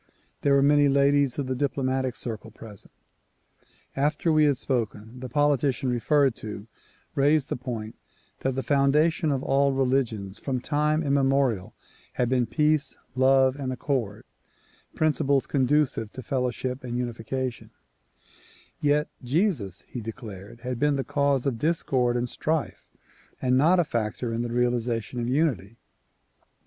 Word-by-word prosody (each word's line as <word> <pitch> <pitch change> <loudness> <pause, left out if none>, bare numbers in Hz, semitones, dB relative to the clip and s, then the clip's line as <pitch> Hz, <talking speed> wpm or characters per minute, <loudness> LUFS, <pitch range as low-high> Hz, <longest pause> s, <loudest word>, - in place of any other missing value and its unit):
There 140 -1 +3
were 135 - +4
many 145 0 +5
ladies 140 -1 +3
of 140 - -1
the 130 - -2
diplomatic 130 -1 -1
circle 115 -1 -6
present. 110 -2 -12 1.0
After 150 +4 +1
we 155 -1 +5
had 145 -3 +2
spoken, 115 -3 -3
the 130 0 -6
politician 140 -1 +1
referred 135 +1 +2
to 105 -1 -7 0.5
raised 145 +1 +2
the - - -1
point 115 -3 -5 0.5
that 130 -1 -1
the 135 - -2
foundation 150 +3 +2
of 135 -1 -1
all 140 0 +2
religions 125 -7 -1
from 130 -2 -2
time 150 +4 0
immemorial 135 -7 +1 0.4
had 125 -1 0
been 125 -2 +1
peace, 150 0 +1 0.2
love 130 0 +4
and 135 -2 -3
accord, 125 -5 -2 0.4
— - - -32
principles 145 -3 +2
conducive 135 -5 +1
to 130 - -8
fellow 125 -1 0
ship 125 +2 -4
and 120 -1 -4
unification, 125 +1 -4 0.6
— - - -25 0.3
yet 150 0 +2 0.2
Jesus, 125 - 0
he 125 - -6
declared 110 -1 -9
had 125 -1 -4
been 150 +1 +2
"the 135 - -1
cause 140 -2 +1
of 125 -5 -1
discord 130 -6 +1
and 120 0 -1
strife 155 +5 -3 0.5
and 125 0 +2
not 165 +7 +4
a - - +5
factor 115 -2 -2
in 115 - -1
the 120 -1 -3
realization 120 -1 -1
of 120 0 -2
unity." 125 - 0
130 Hz, 145 wpm, -26 LUFS, 120-145 Hz, 1.0 s, many